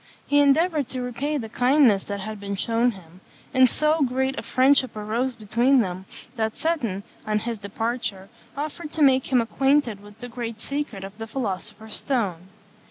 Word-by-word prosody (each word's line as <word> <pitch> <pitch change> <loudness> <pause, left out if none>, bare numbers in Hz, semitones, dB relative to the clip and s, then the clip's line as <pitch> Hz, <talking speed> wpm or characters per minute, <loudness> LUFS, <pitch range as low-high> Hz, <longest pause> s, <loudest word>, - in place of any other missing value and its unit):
He 290 - +3
endeavoured 290 0 +3
to 255 -2 -4
repay 275 +5 -2
the 230 -5 -4
kindness 245 -3 +4
that 200 -1 -4
had 215 +1 -5
been 200 0 -4
shewn 230 +4 +2
him; 180 -1 -15 0.3
and 260 -1 +6
so 305 +4 +1
great 265 0 +1
a - - -4
friendship 260 -1 +3
arose 230 +5 -1
between 240 +5 +3
them 185 -2 -4 0.3
that 220 -1 -1
Seton, 240 - -1 0.2
on 215 0 +2
his 225 +1 -3
departure, 200 -1 -3 0.3
offered 300 +1 -5
to 315 - +2
make 265 -1 +4
him 250 -2 +5
acquainted 270 -2 +1
with 205 0 -15
the 245 - -6
great 230 -2 -5
secret 275 -7 -4
of 195 +3 -9
the 225 - -5
philosopher's 215 -2 -4
stone. 195 -10 -1
235 Hz, 170 wpm, -24 LUFS, 210-270 Hz, 0.3 s, and